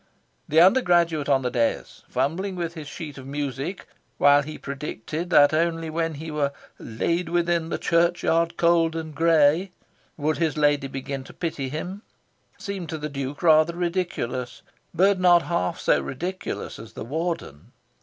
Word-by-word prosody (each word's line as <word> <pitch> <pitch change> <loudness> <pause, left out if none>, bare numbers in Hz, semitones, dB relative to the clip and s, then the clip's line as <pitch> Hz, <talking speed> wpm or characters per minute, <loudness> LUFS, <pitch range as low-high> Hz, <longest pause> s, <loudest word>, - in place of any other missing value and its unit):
The 155 - +4
undergraduate 175 - +4
on 135 -2 +3
the 125 - -1
dais, 115 -2 -1
fumbling 185 +6 -1
with 170 -2 -3
his 155 -4 -8
sheet 150 -3 -8
of 130 - -10
music 140 +5 -4 0.3
while 145 0 +6
he 155 +2 -7
predicted 150 +3 -5
that 145 -4 +6
only 165 0 0
when 165 0 -1
he 160 +2 -7
were 145 -2 -1 0.3
"laid 165 +10 -2
within 170 -1 +1
the - - -1
church 170 +1 +1
yard 165 0 +1
cold 170 -1 +3
and 160 -1 -5
grey" 165 +3 +3 0.5
would 155 +1 -1
his 160 -2 0
lady 145 -2 +2
begin 135 0 -5
to - - -12
pity 150 -6 -3
him, 180 +8 -5 0.6
seemed 195 -4 -6
to 160 - -3
the 150 0 -5
Duke 140 +1 -5
rather 160 0 +5
ridiculous; 170 -8 -3 0.3
but 190 +3 +3
not 175 -2 +5
half 90 - -1
so - - +2
ridiculous 180 +8 -5
as - - -11
the - - -7
Warden. 135 - -4
160 Hz, 160 wpm, -24 LUFS, 145-170 Hz, 0.6 s, while